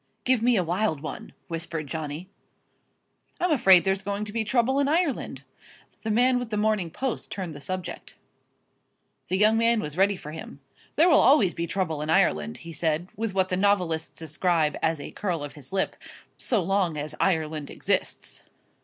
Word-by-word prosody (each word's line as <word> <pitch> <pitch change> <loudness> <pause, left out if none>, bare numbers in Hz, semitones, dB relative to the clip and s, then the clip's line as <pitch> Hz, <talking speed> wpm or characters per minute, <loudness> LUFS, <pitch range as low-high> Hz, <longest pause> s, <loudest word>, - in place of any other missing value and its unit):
"Give 255 -3 +3
me 245 +1 +4
a 185 - +2
wild 175 -2 -1
one" 155 - -7 0.2
whispered 165 -1 -4
Johnny. 155 +3 -5 1.1
"I'm 360 -1 +1
afraid 190 - +6
there's 190 0 +1
going 200 +1 -3
to 210 - -8
be 225 -1 0
trouble 245 +4 +1
in 280 - +2
Ireland," 320 -2 0 0.6
the 220 - -4
man 245 +3 +3
with 245 -2 -5
The 210 - -2
Morning 210 -4 +1
Post 260 +8 -4
turned 185 -5 -5
the 145 - -10
subject. 185 +5 -6 1.1
The 185 - 0
young 215 +2 +4
man 230 0 +3
was 150 -5 -5
ready 200 +1 +3
for 150 - -9
him. 155 -3 -9 0.4
"There 325 +4 +5
will 315 - +6
always 225 - +5
be 170 0 -3
trouble 160 -5 -2
in 155 - -3
Ireland," 75 - +2
he 165 - -7
said, 160 +3 -1
with 220 -3 -3
what 190 -1 +2
the 180 - +1
novelists 180 -5 +1
describe 160 -1 0
as 160 -1 +1
a - - -7
curl 175 -7 -3
of 145 - -7
his 145 -4 -10
lip, 190 0 0 0.4
"so 220 -7 0
long 185 -3 0
as 150 +1 -4
Ireland 155 -5 0
exists." - - -2
185 Hz, 180 wpm, -26 LUFS, 160-220 Hz, 1.1 s, afraid